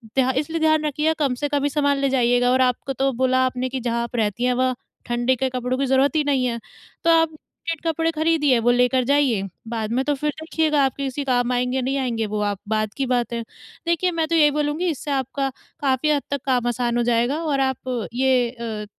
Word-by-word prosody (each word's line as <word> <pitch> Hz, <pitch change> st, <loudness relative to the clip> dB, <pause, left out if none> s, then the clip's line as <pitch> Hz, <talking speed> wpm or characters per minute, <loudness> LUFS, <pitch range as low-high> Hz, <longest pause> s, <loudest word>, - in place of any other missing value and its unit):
ध्या 260 Hz, -1 st, +3 dB
इसलिए 320 Hz, +4 st, -1 dB
ध्यान 310 Hz, -1 st, +3 dB
रखिए 300 Hz, +2 st, +1 dB
कम 280 Hz, -4 st, +1 dB
से -, -, +2 dB
कम 285 Hz, -1 st, 0 dB
ही 290 Hz, -, +2 dB
सामान 285 Hz, -1 st, +1 dB
ले 275 Hz, 0 st, +1 dB
जाइएगा 245 Hz, -1 st, +2 dB
और 260 Hz, +1 st, +3 dB
आपको 260 Hz, +2 st, -4 dB
तो 270 Hz, +1 st, +1 dB
बोला 260 Hz, 0 st, +3 dB
आपने 255 Hz, 0 st, -2 dB
कि 260 Hz, +1 st, -3 dB
जहाँ 235 Hz, 0 st, -1 dB
आप 235 Hz, +1 st, -7 dB
रहती 220 Hz, 0 st, -1 dB
हैं 250 Hz, -, +2 dB
वहाँ 255 Hz, -1 st, +1 dB, 0.3 s
ठंडी 240 Hz, +2 st, +1 dB
के 265 Hz, +2 st, 0 dB
कपड़ों 255 Hz, 0 st, -2 dB
की 275 Hz, -, +1 dB
ज़रूरत 265 Hz, +2 st, +2 dB
ही 310 Hz, -, +3 dB
नहीं 270 Hz, -3 st, +1 dB
है, 235 Hz, -1 st, -2 dB, 0.4 s
तो 335 Hz, -, +2 dB
आप 325 Hz, -1 st, +4 dB, 0.4 s
ठंडे 330 Hz, 0 st, -2 dB
कपड़े 325 Hz, +1 st, 0 dB
खरीदिए 310 Hz, -4 st, +2 dB
वो 240 Hz, +2 st, +3 dB
लेकर 250 Hz, +1 st, +3 dB
जाइए, 275 Hz, -6 st, +2 dB, 0.3 s
बाद 225 Hz, -1 st, -3 dB
में 260 Hz, +2 st, +1 dB
तो 295 Hz, -, +1 dB
फिर 300 Hz, +2 st, -2 dB
देखिएगा 315 Hz, -2 st, +1 dB
आपके 270 Hz, +1 st, -3 dB
किसी 270 Hz, +2 st, -3 dB
काम 245 Hz, -2 st, +1 dB
आएँगे 250 Hz, +1 st, 0 dB
नहीं 265 Hz, +2 st, -1 dB
आएँगे, 235 Hz, -4 st, -1 dB
वो 210 Hz, 0 st, -3 dB
आप 205 Hz, -2 st, -1 dB
बाद 215 Hz, -1 st, 0 dB
की 275 Hz, -, 0 dB
बात 240 Hz, -1 st, 0 dB
है। 235 Hz, -, -2 dB, 0.5 s
देखिए 340 Hz, +2 st, +1 dB
मैं 325 Hz, -2 st, -1 dB
तो 335 Hz, -, +1 dB
यही 300 Hz, -2 st, +5 dB
बोलूँगी 300 Hz, +4 st, 0 dB
इससे 295 Hz, -1 st, -4 dB
आपका 270 Hz, 0 st, -1 dB, 0.3 s
काफ़ी 275 Hz, +2 st, +1 dB
हद 290 Hz, -1 st, +2 dB
तक 280 Hz, -2 st, -1 dB
काम 250 Hz, -3 st, +1 dB
आसान 240 Hz, 0 st, -1 dB
हो 240 Hz, -, +2 dB
जाएगा 240 Hz, +6 st, +1 dB
और 290 Hz, -4 st, 0 dB
आप 250 Hz, -3 st, -4 dB
ये 255 Hz, -1 st, +2 dB
अ, 230 Hz, -3 st, -6 dB
260 Hz, 230 wpm, -22 LUFS, 245-290 Hz, 0.5 s, यही